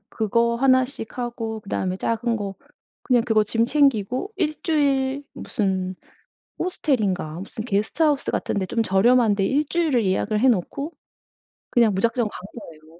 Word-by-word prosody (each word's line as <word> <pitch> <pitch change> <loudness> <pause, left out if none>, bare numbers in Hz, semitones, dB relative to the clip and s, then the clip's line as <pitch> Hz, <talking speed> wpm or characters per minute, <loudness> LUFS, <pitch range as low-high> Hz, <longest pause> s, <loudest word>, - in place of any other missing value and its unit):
그거 235 +2 +1
1 260 0 +4
씩 250 -4 -8
하고 230 -2 -4
그다음에 190 -2 -2
작은 230 +3 -1
거 200 -2 -4 0.5
그냥 245 -3 +3
그거 220 -3 +3
짐 225 +2 +1
챙기고 270 - +1
1 310 -5 -1
주일 280 -3 +1
무슨 190 -4 -2 0.6
호스텔인가 205 - -1
무슨 210 +3 -7
게스트하우스 270 +8 +1
같은 - - -2
데 195 - 0
좀 230 +3 0
저렴한 220 +2 +4
데 195 - 0
1 290 +8 +1
주일을 300 - +1
예약을 205 +3 0
해놓고 260 - 0 0.8
그냥 230 -4 +4
무작정 230 +4 +1
간 - - -8 0.2
거예요. 160 -2 -15
230 Hz, 290 characters per minute, -23 LUFS, 200-265 Hz, 0.8 s, 1